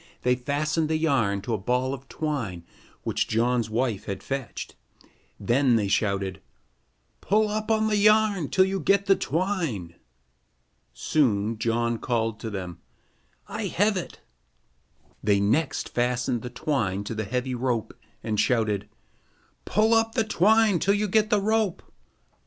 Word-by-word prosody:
They 125 - +3
fastened 150 +5 -1
the 160 - +1
yarn 130 -11 +1
to 120 - -2
a 110 - -1
ball 125 +6 0
of 135 0 -8
twine 120 - -3 0.4
which - - -1
John's 115 0 +1
wife 115 -2 -1
had 100 -1 -5
fetched. 135 -5 -5 0.6
Then 125 0 +2
they 105 -3 +1
shouted: 100 -2 -1 0.8
"Pull 215 +2 +2
up 215 +1 -2
the 220 -1 +2
yarn 210 -5 +3
till 190 - +4
you 190 0 -2
get 200 +4 +2
the 195 0 +5
twine." 160 - -2 1.0
Soon 110 - 0
John 115 0 0
called 115 -3 -1
to 110 - -5
them: 90 -5 -6 0.7
"I - - -4
have 205 +2 +1
it." 185 - -6 1.0
They 100 -1 +3
next 110 +11 0
fastened 125 0 0
the 125 - -6
twine 110 -7 -1
to 105 - -5
the 110 -1 -3
heavy 125 +4 -2
rope 120 -3 -2 0.3
and 110 -2 -1
shouted: 105 -3 +1 0.8
"Pull 220 +2 +2
up 225 0 +2
the 225 - +3
twine 215 -1 +3
till 200 +4 +2
you 210 +1 0
get 215 +2 +2
the 210 -2 +3
rope." 215 -3 0
130 Hz, 145 wpm, -26 LUFS, -, 1.0 s, the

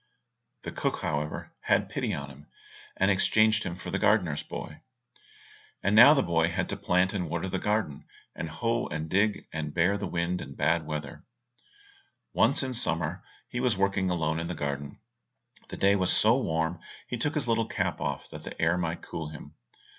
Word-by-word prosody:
The - - -5
cook, - - -2
however, 75 -1 -3
had - - +2
pity - - -2
on 70 0 -4
him, 70 +3 -15 0.5
and 95 +2 +3
exchanged 110 +3 +3
him 90 -4 -4
for 90 - -7
the 95 - -1
gardener's 100 -8 +2
boy. - - -8 1.0
And 100 +2 +2
now 120 +7 +10
the 135 - +3
boy 80 -1 +2
had 85 - -2
to - - -2
plant 90 +1 +1
and 90 -5 -2
water 85 +3 -2
the 95 0 -2
garden, 105 -9 -1 0.3
hoe 115 +10 -1
and 75 +1 -4
dig, 105 +2 +1
and 75 -1 -4
bear 90 +4 +2
the 100 - -3
wind 85 +1 -1
and 70 - -9
bad 80 -1 +1
weather. 75 +1 -5 1.1
Once - - +3
in 130 -1 -3
summer 80 -9 +1
when 90 +2 -9 0.3
he 120 - -3
was 125 -5 +1
working 95 -1 +1
alone 80 -2 0
in 85 - -3
the 90 - -4
garden, 70 0 -4 0.7
the - - -6
day 100 +1 +4
was 95 -2 +1
so 110 +2 +5
warm 80 -8 -1 0.3
he - - -3
took 145 +6 -1
his 150 -5 -1
little 115 -1 +1
cap - - -2
off - - -3
that - - -9
the - - -9
air 85 +2 +2
might 85 -1 -3
cool 80 -2 -5
him. 75 -1 -11
90 Hz, 190 wpm, -28 LUFS, 80-105 Hz, 1.1 s, now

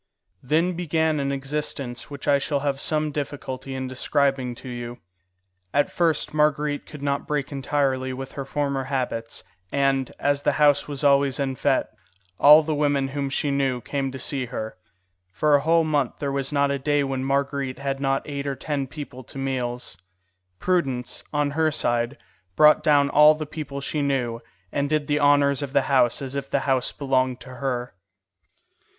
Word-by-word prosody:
Then 160 +7 +1
began 160 -2 0
an 140 0 -1
existence 135 -3 -4
which 140 -1 -8
I 140 -1 +4
shall 140 0 -1
have 140 -1 -1
some 155 -1 0
difficulty 135 -2 -5
in 130 0 -3
describing 130 -1 0
to 130 - -11
you. 120 -1 -6 0.8
At 145 0 +2
first 165 -4 0
Marguerite 150 -1 +1
could 150 -2 -10
not 140 0 -1
break 150 -2 -2
entirely 135 -1 0
with 135 +1 -6
her 140 - -5
former 140 -1 -2
habits, 125 -4 -3 0.3
and, 135 -2 +1
as 145 0 +1
the - - +2
house 145 -1 +3
was 145 0 -5
always 140 -1 +3
en 135 -1 -1
fête, - - +1 0.5
all 150 +2 +8
the 155 0 -1
women 145 -2 +1
whom 140 0 -2
she 140 +1 -1
knew 135 -2 0
came 135 +2 -3
to 135 - -6
see 130 0 -1
her. 110 -3 -5 0.6
For 150 +11 +2
a 145 - +5
whole 165 +2 +3
month 145 -5 0
there 140 -1 -2
was 135 0 -2
not 140 -1 +2
a 140 - -1
day 145 +1 +1
when 135 -1 -2
Marguerite 140 -1 -1
had 135 0 -3
not 135 0 0
eight 140 -1 -4
or 140 - -1
ten 140 -1 -3
people 135 -2 -8
to - - -11
meals. 125 -5 -3 0.6
Prudence, 135 - -1
on 145 -1 0
her 160 +2 +2
side, 120 -1 0 0.4
brought 150 0 +6
down 145 -2 +3
all 150 +1 +7
the 155 0 -5
people 150 -2 -6
she 150 +2 -2
knew, 125 -5 -1 0.3
and 140 0 -1
did 155 -1 +1
the 145 0 +1
honours 145 -1 +4
of 140 -1 -5
the - - +3
house 130 0 +3
as 130 -1 -5
if 140 -1 -4
the - - +1
house 130 -2 +1
belonged 130 -2 0
to 125 - -11
her. 125 -2 -3
140 Hz, 180 wpm, -24 LUFS, 130-145 Hz, 0.8 s, all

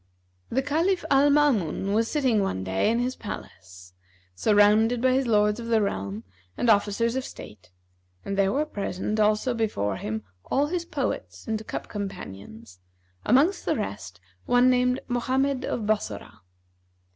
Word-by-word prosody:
The 265 +2 0
Caliph 335 +6 0
Al 280 +1 +5
Maamun 225 - +2
was 225 +1 +2
sitting 260 -8 +2
one 95 - -2
day 95 - 0
in 230 - +1
his 250 +2 -1
palace, 90 - -10 0.4
surrounded 210 - +4
by 255 +2 +3
his 260 0 +1
Lords 210 0 +2
of 230 - -6
the 230 -1 +3
realm 100 - -3 0.3
and 235 - +3
Officers 215 +3 +1
of 265 - -1
state, 105 - -11 0.6
and 200 - -3
there 195 0 +2
were 295 +7 0
present 210 -4 -3
also 215 +4 +2
before 105 - -1
him 110 +1 -4 0.2
all 280 +2 +1
his 340 +2 -3
poets - - -4
and 220 -1 -3
cup - - -5
companions 110 - -8 0.5
amongst 300 - +3
the - - 0
rest 95 -2 -5 0.3
one 245 +1 +5
named 250 0 +2
Mohammed 260 +2 0
of 220 - -3
Bassorah. 205 - -3
220 Hz, 150 wpm, -26 LUFS, 180-255 Hz, 0.6 s, Al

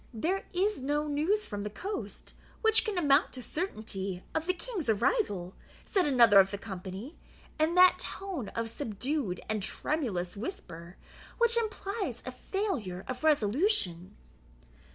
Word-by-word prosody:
"There 365 - -1
is 390 -1 0
no 295 +3 0
news 320 +9 +1
from 205 -2 -5
the 210 - -3
coast 390 - -6 0.3
which 445 0 +5
can 425 -4 -2
amount 290 -3 +4
to 255 - -6
certainty 200 - -3
of 320 +1 -1
the 365 - +3
King's 380 - -4
arrival," 205 - +1 0.3
said 375 -5 +2
another 235 -7 +7
of 190 0 +6
the 200 - -4
company, 195 - -7 0.4
in 315 +3 +2
that 365 0 +7
tone 365 - -4
of 230 -1 -2
subdued 230 -3 -2
and 215 -1 -1
tremulous 195 - -1
whisper 180 - -7 0.4
which 470 -1 +4
implies 435 -2 -2
a - - -4
failure 260 - -3
of 255 +3 -5
resolution. 240 - +1
280 Hz, 140 wpm, -30 LUFS, -, 0.4 s, another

